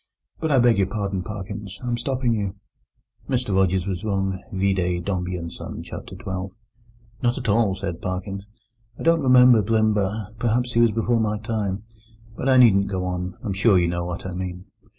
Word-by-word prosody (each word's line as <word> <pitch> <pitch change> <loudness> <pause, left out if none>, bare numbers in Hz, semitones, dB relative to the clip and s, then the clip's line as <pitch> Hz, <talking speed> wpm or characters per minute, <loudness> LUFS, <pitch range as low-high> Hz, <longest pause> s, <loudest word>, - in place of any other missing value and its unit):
"But 160 -1 -1
I 135 - +5
beg 120 -4 +4
your 95 - +3
pardon, 100 -3 -2
Parkins: 100 0 -6
I'm 120 -1 0
stopping 125 -1 0
you." 100 -3 -2 0.7
Mr 125 -7 0
Rogers 95 -1 +2
was 95 -3 -3
wrong, 95 -2 -1
vide 95 -2 0
Dombey 90 -2 -2
and 85 -1 -6
Son, - - -7
chapter - - -8
xii. - - -13
"No, 95 0 -3 0.7
not 120 0 +1
at - - -4
all," 105 -2 +3
said 85 -3 -5
Parkins. 95 +2 -4 0.5
"I - - -7
don't 165 0 +4
remember 125 -3 +7
Blimber; 105 -1 0
perhaps 120 +1 0
he 115 - +2
was 120 -1 +5
before 115 +2 +1
my 105 -1 0
time. 105 -2 -3 0.5
But 135 - -1
I 130 - +6
needn't 100 -6 +6
go 95 -2 -2
on. 90 0 -3
I'm 105 -4 -2
sure 100 +1 +4
you 85 -1 +2
know 85 0 -2
what 90 +1 -5
I 95 - -4
mean." 90 0 -5
100 Hz, 190 wpm, -23 LUFS, 95-115 Hz, 0.7 s, remember